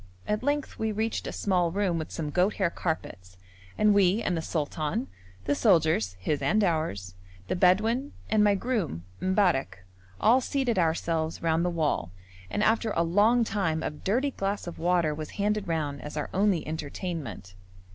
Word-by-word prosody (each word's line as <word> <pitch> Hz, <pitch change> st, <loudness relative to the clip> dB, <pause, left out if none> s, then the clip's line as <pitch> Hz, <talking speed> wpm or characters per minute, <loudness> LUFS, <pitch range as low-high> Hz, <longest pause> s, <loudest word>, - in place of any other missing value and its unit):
At 210 Hz, 0 st, 0 dB
length 285 Hz, +2 st, -2 dB
we 220 Hz, 0 st, 0 dB
reached 220 Hz, +2 st, -2 dB
a -, -, -3 dB
small 180 Hz, -4 st, +1 dB
room 185 Hz, -3 st, 0 dB
with 155 Hz, -, -5 dB
some 150 Hz, -2 st, -4 dB
goat 180 Hz, +6 st, +2 dB
hair 185 Hz, -4 st, +1 dB
carpets 95 Hz, -, -4 dB, 0.4 s
and 210 Hz, -1 st, +4 dB
we 200 Hz, 0 st, +4 dB
and 180 Hz, -, 0 dB
the 165 Hz, -, -1 dB
sultan, 160 Hz, -, -2 dB, 0.4 s
the 145 Hz, -, +2 dB
soldiers 155 Hz, -, +3 dB
(his 145 Hz, +10 st, -1 dB
and 215 Hz, 0 st, +2 dB
ours), 155 Hz, -, -1 dB, 0.4 s
the -, -, 0 dB
Bedouin 220 Hz, +10 st, +2 dB, 0.2 s
and 215 Hz, -1 st, +3 dB
my 205 Hz, -1 st, +4 dB
groom, 195 Hz, -, -2 dB, 0.2 s
M'barrek, 170 Hz, -, +1 dB, 0.3 s
all 235 Hz, +5 st, +5 dB
seated 255 Hz, -5 st, 0 dB
ourselves 165 Hz, -1 st, 0 dB
round 165 Hz, 0 st, +2 dB
the 180 Hz, -, +1 dB
wall, 150 Hz, -, -1 dB, 0.4 s
and 210 Hz, -, -1 dB
after 225 Hz, +1 st, +2 dB
a 170 Hz, -, +3 dB
long 210 Hz, +8 st, +4 dB
time 165 Hz, -8 st, -1 dB
a -, -, -1 dB
dirty 235 Hz, -, -1 dB
glass 200 Hz, -3 st, -3 dB
of 175 Hz, -, -7 dB
water 170 Hz, -2 st, +2 dB
was 155 Hz, 0 st, -6 dB
handed 210 Hz, 0 st, 0 dB
round 150 Hz, -4 st, -2 dB
as 150 Hz, +1 st, -7 dB
our 150 Hz, -, -3 dB
only 195 Hz, -5 st, +1 dB
entertainment. 155 Hz, -, -5 dB
180 Hz, 170 wpm, -27 LUFS, 155-210 Hz, 0.4 s, all